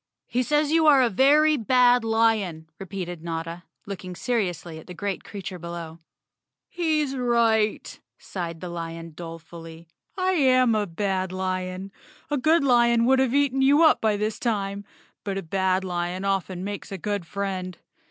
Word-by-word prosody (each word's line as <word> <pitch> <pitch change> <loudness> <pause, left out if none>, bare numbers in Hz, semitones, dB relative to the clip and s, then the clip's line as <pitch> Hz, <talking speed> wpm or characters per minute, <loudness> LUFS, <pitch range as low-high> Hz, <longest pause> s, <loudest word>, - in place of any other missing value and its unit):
"He 250 - -1
says 295 +3 +1
you 320 -1 +4
are 280 -3 +7
a 240 - +1
very 295 +7 +4
bad 245 +1 +4
lion," 220 -8 +1
repeated 180 -3 -6
Notta, 165 +1 -5 0.2
looking 185 -3 -7
seriously 175 -5 -2
at - - -15
the 180 - -9
great 195 +3 -3
creature 190 -3 -7
below. 170 -1 -7 0.7
"He's 310 -5 0
right," 230 -4 +1 0.2
sighed 170 -3 -6
the 180 - -5
lion 165 -1 -6
dolefully. 165 0 -10 0.3
"I 370 0 +1
am 255 -7 +4
a 210 -1 0
bad 190 +1 -2
lion. 185 0 -3 0.4
A 295 - +1
good 315 +3 +3
lion 235 -3 +4
would 265 +1 +4
have 265 -1 +1
eaten 275 -2 +2
you 285 +4 +5
up 315 - +5
by 215 -2 +2
this 215 +1 -2
time, 200 -3 -2 0.4
but 195 -1 -3
a 195 - -4
bad 190 +2 0
lion 180 +1 -3
often 190 -2 -1
makes 200 0 -6
a 195 - -4
good 205 -2 -3
friend. 190 -2 -4
200 Hz, 160 wpm, -25 LUFS, 175-245 Hz, 0.7 s, are